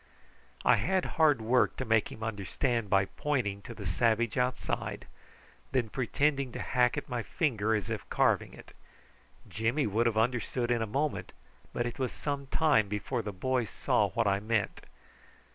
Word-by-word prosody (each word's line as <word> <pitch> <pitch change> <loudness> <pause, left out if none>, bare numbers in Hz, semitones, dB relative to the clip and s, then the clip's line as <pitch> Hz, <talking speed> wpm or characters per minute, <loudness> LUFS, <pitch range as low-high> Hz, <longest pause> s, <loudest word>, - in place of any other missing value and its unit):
I - - +6
had 190 -1 +1 0.2
hard 150 -7 +5
work 125 +3 +2
to 130 - -3
make 110 -2 +2
him 110 - -8
understand 110 +2 -1
by 95 0 +4
pointing 110 -7 -2
to 115 - -9
the 105 - -8
savage 115 +4 +1
outside, 125 0 -2
and 130 -1 -6
then 110 - -13
pretending 135 +4 0
to - - -5
hack 125 -1 +2
at - - -4
my 120 -1 -2
finger 110 -5 0
as 105 -5 -2
if - - -5
carving - - +1
it. - - -14 0.7
Jimmy 120 +7 0
would 110 +3 +2
have 110 -2 0
understood 120 +1 0
in 120 -1 +2
a 110 - -1
moment, 140 +7 -2 0.4
but 120 - -1
it 120 - -5
was 130 -2 -1
some 140 -2 -4
time 150 -8 +3
before 105 +5 -2
the 105 -1 -5
boy 125 +6 0
saw - - +1
what - - 0
I 100 -1 +2
meant. 110 0 -1
120 Hz, 175 wpm, -30 LUFS, 110-130 Hz, 0.7 s, I